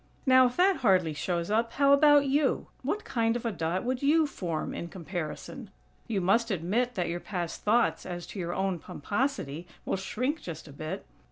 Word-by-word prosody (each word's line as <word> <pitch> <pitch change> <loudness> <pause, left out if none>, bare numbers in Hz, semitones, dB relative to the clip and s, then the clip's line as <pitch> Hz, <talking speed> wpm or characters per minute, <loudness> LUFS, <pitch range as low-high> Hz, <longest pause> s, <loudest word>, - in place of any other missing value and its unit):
Now, 260 -1 +7
if 245 - -6
that 375 +1 +4
hardly 185 -9 +3
shows 170 +4 -2
up, 230 +2 +1
how 280 0 +5
about 290 0 +6
you? 275 0 +1 0.2
What 400 +11 -2
kind 230 -2 +1
of 240 - -4
a 230 - +1
dot 170 0 -2
would 250 +1 -1
you 310 +3 +4
form 175 - -3
in 170 - -5
comparison? 180 - -6 0.4
You 210 -5 -1
must 225 +6 +2
admit 215 +7 0
that 180 -3 -1
your 175 +1 -2
past 175 -3 -4
thoughts 230 +3 +2
as 175 -1 -6
to 200 - -6
your 175 -1 -3
own 190 -2 -1
pomposity 180 - -3 0.2
will - - 0
shrink 255 - -2
just 165 -2 -7
a 145 - -11
bit! 155 +7 -5
205 Hz, 190 wpm, -29 LUFS, 175-260 Hz, 0.4 s, Now